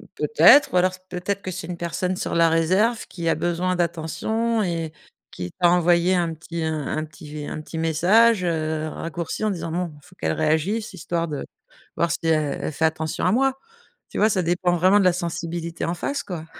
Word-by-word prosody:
peut-être, 290 - +6
ou - - +3
alors 185 +1 +3 0.2
peut-être 185 +3 -3
que 185 - -5
c'est 175 -2 -6
une 175 -1 -5
personne 170 +2 -2
sur - - -3
la 165 0 +5
réserve 185 +9 +2
qui 170 -2 -5
a - - +3
besoin 175 +1 -1
d'attention 215 +7 -1
et 165 -3 -2 0.4
qui 90 -1 -6
t'a 175 -1 +5
envoyé 175 +1 +3
un 170 -2 0
petit 165 +1 -6
un 155 0 -2
petit 150 0 -13
v 150 -1 -6
un 155 - -5
petit 160 - -8
message, 180 +7 +4
heu, 175 - +1 0.4
un - - -4
raccourci 170 +4 -4
en 215 - +1
disant 170 -3 -4
bon, 175 -1 -2
il - - -16
faut 180 0 -19
qu'elle - - -2
réagisse, 160 +9 0
histoire 170 -1 -2
de 150 -3 -5 0.5
voir 170 -1 +1
si - - -1
elle 155 -3 +1
elle - - -2
fait 160 +2 0
attention 160 0 -1
à 180 - +4
moi. 270 +4 +3 0.6
Tu - - -7
vois? 215 +2 +4
Ça 190 - +1
dépend 175 +1 +1
vraiment 185 +4 +4
de 195 - +2
la 180 - +5
sensibilité 170 -1 -4
en 170 - -1
face, 280 +11 -3
quoi. 170 -4 -6
170 Hz, 210 wpm, -23 LUFS, 160-185 Hz, 0.6 s, peut-être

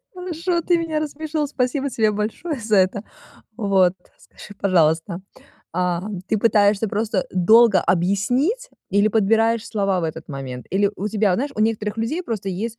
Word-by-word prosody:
Хорошо, 355 -1 -2
ты 350 - +2
меня 320 -2 -2
рассмешил. 305 0 -3
Спасибо 270 +1 -1
тебе 220 -3 +2
большое 225 +9 -3
за 220 -2 0
это. 190 +2 +2 0.5
Вот, 190 -4 +2 0.2
скажи, 205 - -14
пожалуйста, 170 -1 +1 0.5
а, 180 0 -1 0.3
ты 220 - +1
пытаешься 210 -1 +3
просто 210 -1 -1
долго 215 +3 +5
объяснить 245 - 0 0.2
или 205 +2 +3
подбираешь 225 +1 +2
слова 195 -4 0
в - - -2
этот 160 0 -6
момент? 130 -4 -7
Или 200 +2 +2
у 200 - -3
тебя, 210 -1 +1
вот 180 - +2
знаешь, 280 +3 -2
у 215 - -3
некоторых 215 -1 0
людей 255 +11 -2
просто 210 -4 -4
есть, 220 +5 -4
215 Hz, 160 wpm, -21 LUFS, 190-250 Hz, 0.5 s, долго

